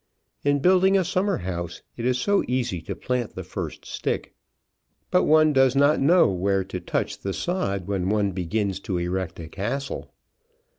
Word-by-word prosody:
In 145 0 +3
building 190 +3 +5
a 190 - +1
summer 190 +3 +1
house 85 -2 -5
it 120 - -4
is 125 0 +2
so 200 +10 +2
easy 120 -8 -1
to - - -5
plant 125 -3 -2
the - - -5
first - - -6
stick, - - -3 0.8
but 180 - +4
one 155 0 +5
does 135 -1 +4
not 140 +2 +4
know 175 +6 +5
where 95 +1 +1
to 90 -1 -5
touch - - -2
the 95 - -3
sod 100 - -2
when 95 -2 -1
one 105 -1 +1
begins 95 +2 -2
to 95 -2 -3
erect 90 0 -3
a 80 - -7
castle. 115 - -4
115 Hz, 175 wpm, -25 LUFS, 95-150 Hz, 0.8 s, building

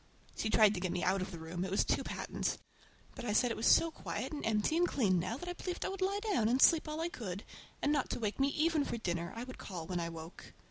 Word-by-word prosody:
She 220 - -1
tried 215 -1 +6
to 190 - -3
get 180 -1 -1
me 180 - -2
out 190 +1 +2
of 185 - -3
the 175 - -7
room—it 175 +3 -4
was 195 - +2
too - - +1
patent! - - -2 0.6
But - - -8
I 215 -3 -1
said 245 +2 +3
it - - -1
was 220 - 0
so 330 - +6
quiet - - -5
and 295 - -4
empty 220 +7 +1
and 350 +1 +4
clean 195 - +2
now 225 +7 -2
that 355 - -8
I 355 - -2
believed 360 0 -4
I - - -1
would 390 0 -6
lie 390 +2 +1
down 440 - -1
again 225 - +2
and 250 +2 +2
sleep 325 -3 +6
all 305 +1 -3
I 335 - 0
could; 200 - -6 0.4
and 290 - +3
not 290 -3 +1
to - - -2
wake 215 0 -2
me 270 - +4
even 310 +1 +2
for 235 - -3
dinner—I 175 +2 -3
would 255 0 -9
call 175 -5 -6
when 175 +1 -2
I 170 0 -2
woke. 165 - -10
225 Hz, 280 wpm, -34 LUFS, 185-305 Hz, 0.6 s, tried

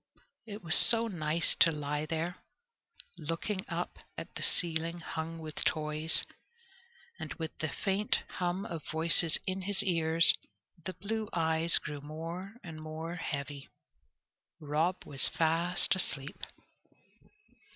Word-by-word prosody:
It 205 -2 -9
was 160 -1 -1
so 230 +4 +7
nice 165 -4 0
to 165 - +6
lie 150 0 -4
there, 165 +3 -3 0.8
looking 185 +5 -4
up - - -5 0.2
at - - -8
the - - -7
ceiling 165 0 0
hung 165 0 -6
with 155 -2 -6
toys, 155 0 0 1.0
and - - -7
with 160 -3 -6
the 155 - -2
faint 200 +7 -1
hum 180 +2 -3
of 165 -6 -6
voices 165 +1 +5
in 190 +1 -3
his 200 +1 0
ears. 165 -2 +7 0.5
The 185 - -5
blue 215 +4 -4
eyes 160 0 +3
grew 145 -2 -6
more 165 +7 -7
and 160 -4 -9
more 160 +2 -6
heavy. 140 -3 -6 0.9
Rob 155 +4 -1
was 135 -2 0
fast 170 +3 +1
asleep. 145 -6 -5
165 Hz, 125 wpm, -31 LUFS, 155-180 Hz, 1.0 s, so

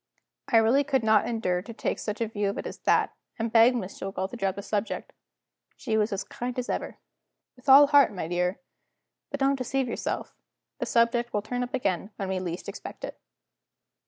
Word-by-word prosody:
I 230 - +4
really 230 +6 +4
could 270 -3 +1
not 220 0 +4
endure 200 -7 0
to 230 +5 -9
take - - -2
such 210 +1 -4
a 230 - +1
view 205 -2 -1
of 200 - -4
it - - -4
as - - -7
that, - - +2 0.2
and 225 -1 -2
begged 235 +2 +6
Miss 195 -5 -5
Jillgall 195 0 -3
to - - -6
drop 195 -5 -1
the 200 - -6
subject. 210 +1 -3 0.6
She 225 -5 -2
was 215 0 +2
as 195 0 -2
kind 245 +1 -5
as 250 - -3
ever. - - -3 0.6
"With 255 +2 -7
all 275 +2 +10
my 285 - -7
heart, 280 -8 +6 0.2
dear. 180 +2 0 0.7
But 285 - -4
don't 275 0 +3
deceive 260 +1 -1
yourself 235 - -3 0.5
the - - -2
subject 235 0 +2
will 210 - 0
turn 245 +3 -3
up 245 +1 -2
again 195 -6 -1
when 195 -1 -4
we 190 -1 -1
least 175 -1 -5
expect - - -8
it." - - -6
225 Hz, 205 wpm, -27 LUFS, 200-250 Hz, 0.7 s, all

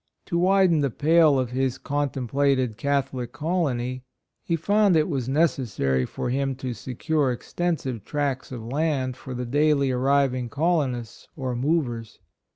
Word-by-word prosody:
To 170 - -1
widen 185 -2 +4
the 140 - +1
pale 155 +2 +4
of 125 -2 -1
his 130 0 0
contem 140 -3 -2
plated 135 -3 +1
Catholic 135 -2 -1
colony, 130 -6 -1 0.4
he 170 - 0
found 200 +3 +3
it 155 -1 +3
was 130 -6 -2
necessary 120 - +1
for 120 - -4
him 135 0 0
to 130 -1 -4
secure 135 +5 -1
ex 120 - -8
tensive 135 - -1
tracts 140 0 -2
of 120 -3 -6
land 135 0 -1
for 130 0 -8
the 125 0 -3
daily 145 +1 +2
arriving 130 -1 +1
colonists 140 -6 -1
or 130 -5 -3
"movers." 120 -5 -1
135 Hz, 150 wpm, -25 LUFS, 125-155 Hz, 0.4 s, widen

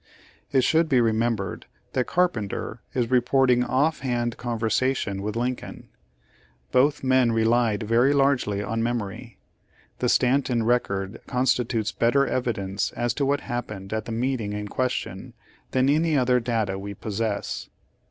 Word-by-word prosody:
It 130 -2 +3
should 160 +3 +3
be 130 -4 +4
remembered 115 -3 0 0.3
that 130 -1 0
Carpenter 120 - -1
is 120 -2 0
reporting 125 0 +3
off 145 +6 +1
hand 120 -3 -1
conversation 115 -3 -1
with 105 +1 -3
Lincoln. 125 +1 -4 0.8
Both 140 +3 +3
men 130 -3 +3
relied 115 -1 +2
very 115 +5 +3
largely 135 -8 +2
on 115 +2 -2
memory. 115 -1 -3 0.6
The - - +1
Stanton 125 -2 +2
rec 120 +2 +2
ord 95 0 -4
constitutes 125 -3 0
better 140 +4 +2
evidence 100 -7 -2
as 120 -1 -1
to 140 +1 -1
what 145 0 +1
hap 120 0 -4
pened 95 -1 -8
at 110 -1 -2
the - - -6
meeting 115 -3 -1
in 105 0 -4
question, 130 +3 -3 0.3
than 130 0 +2
any 155 +2 +2
other 125 -1 +3
data 110 -5 -1
we 100 +1 -6
possess. 105 +1 -3
120 Hz, 145 wpm, -25 LUFS, 110-130 Hz, 0.8 s, be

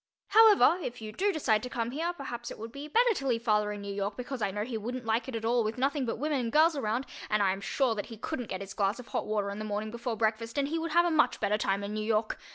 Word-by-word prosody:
However, 420 -4 +7
if 245 -5 -5
you 215 -1 -7
do 400 - +1
decide 235 - +1
to 250 - -5
come 235 -1 -2
here, 325 +6 -1
perhaps 245 -7 -6
it - - -8
would 225 +1 -7
be 280 +4 -7
better 470 +9 +4
to 275 -8 -4
leave 235 -2 0
father 210 -2 +2
in 205 -1 -6
New 200 0 -5
York 200 +1 -3
because 250 0 -5
I 205 - +1
know 205 +2 -3
he 235 +1 -5
wouldn't 240 +3 -4
like 225 +2 0
it 260 - -5
at 225 0 -3
all 235 0 +3
with 220 +3 -3
nothing 275 0 0
but 230 - -2
women 295 +2 0
and 235 -2 -2
girls 315 +3 +5
around 240 0 -1 0.2
and 210 -1 +2
I 190 - +3
am 195 +1 -4
sure 240 +5 +1
that 205 -2 -4
he 225 - -9
couldn't 245 0 -4
get 185 - -4
his 195 0 -7
glass 200 +1 0
of 250 -2 -11
hot - - -2
water 205 -2 -1
in 200 - -6
the - - -4
morning 215 0 -3
before 235 0 -4
breakfast 230 +3 -1
and 280 0 +1
he 325 +2 -1
would 325 -1 -3
have 345 +1 +5
a 345 - +1
much 310 -1 +3
better 210 - +1
time 200 -1 0
in 200 +1 -4
New 215 0 -2
York. 220 0 0
230 Hz, 305 wpm, -30 LUFS, 215-275 Hz, 0.2 s, However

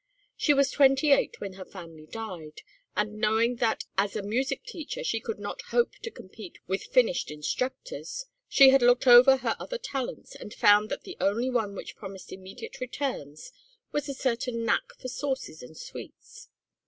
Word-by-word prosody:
She 295 - +3
was 275 0 +3
twenty 270 +1 +4
eight 275 - +3
when 195 -2 -6
her 190 0 -8
family 165 -5 -12
died, 180 -9 -8 0.3
and 210 0 -1
knowing 225 +2 +2
that 230 -2 0 0.2
as 200 0 +1
a 210 - -2
music 245 +7 -1
teacher 475 +3 -6
she - - 0
could 450 - -5
not - - -6
hope 475 - +2
to 460 - -5
compete 195 - -12
with 190 +2 -2
finished 245 -9 +2
instructors, 265 - -4 0.2
she 270 -1 +8
had 270 0 +5
looked 245 +2 +4
ever 255 +2 +9
her 235 -3 -1
other - - -4
talents 270 - -5
and 210 - -9
found 210 +1 +5
that 280 - -4
the 370 - -9
only 230 +6 +1
one 220 -5 -1
which - - -8
promised 195 -2 -9
immediate 190 +1 -9
returns 255 - -4 0.4
was 295 0 -2
a 275 - -3
certain 240 -2 -1
knack 230 - +1
for - - -7
sauces 265 - -4
and 155 +6 -12
sweets. - - -11
235 Hz, 175 wpm, -28 LUFS, 200-270 Hz, 0.4 s, ever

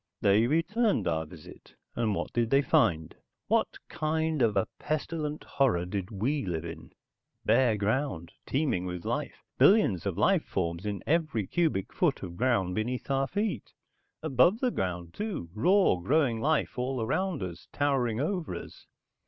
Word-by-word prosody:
"They 105 +4 +4
returned 200 - +1
our 80 -1 -1
visit, 80 -2 -14 0.2
and 110 -3 0
what - - -4
did 120 -2 +1
they 140 +2 +4
find? 80 -10 +2 0.3
What - - +1
kind 160 -1 -1
of 110 -4 +3
a 100 - +2
pestilent 155 0 -3
horror 115 -11 +1
did 95 0 -4
we 125 +8 -1
live 85 -4 -3
in? 80 -1 -9 0.5
Bare 120 -5 +4
ground, 105 - -1 0.2
teeming 130 - 0
with 90 -1 -6
life, - - -3 0.2
billions 185 - +4
of - - -3
life - - +3
forms 85 +4 -3
in 100 -2 -4
every 155 - +1
cubic 155 - 0
foot - - +1
of 85 -2 -6
ground 115 -6 +1
beneath 120 +6 -3
our 135 0 +1
feet. 200 - -3 0.5
Above 160 - +3
the 255 -1 +1
ground, 90 - -3
too. 200 - -4
Raw, 180 - +4
growing 125 - +1
life 150 -2 0
all 130 +1 -1
around 175 - -1
us, 85 -1 -7
towering 130 -6 0
over 170 +3 -2
us. - - -10
125 Hz, 155 wpm, -29 LUFS, 95-155 Hz, 0.5 s, They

